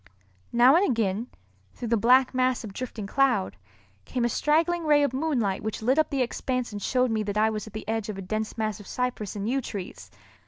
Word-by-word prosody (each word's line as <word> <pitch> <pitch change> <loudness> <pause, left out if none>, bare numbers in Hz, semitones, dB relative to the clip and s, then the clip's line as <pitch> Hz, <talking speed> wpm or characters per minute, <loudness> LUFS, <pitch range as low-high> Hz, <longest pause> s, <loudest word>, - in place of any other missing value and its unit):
Now 245 +4 +6
and 355 - +4
again, 225 -1 0 0.5
through 240 - -5
the 230 - +3
black 250 +5 +4
mass 255 -1 +1
of 210 -3 -8
drifting 230 -2 -5
cloud, 245 -3 +1 0.5
came 245 -2 -2
a - - +1
straggling 330 +7 +1
ray 295 -2 +4
of 280 - 0
moonlight 260 -9 0
which 220 0 -4
lit 260 +6 +3
up 310 - +2
the 270 -2 +1
expanse 250 0 -3
and 205 -1 -6
showed 255 +2 +1
me 220 -1 0
that 210 0 -3
I 220 +1 +3
was 215 0 -4
at 215 - -12
the 215 - -7
edge 225 -1 -2
of 205 - -5
a 195 - -6
dense 215 +4 -3
mass 215 -1 -2
of 205 - -12
cypress 250 -6 -3
and 205 0 -3
yew 270 +3 0
trees. 200 -6 -7
235 Hz, 225 wpm, -26 LUFS, 215-260 Hz, 0.5 s, Now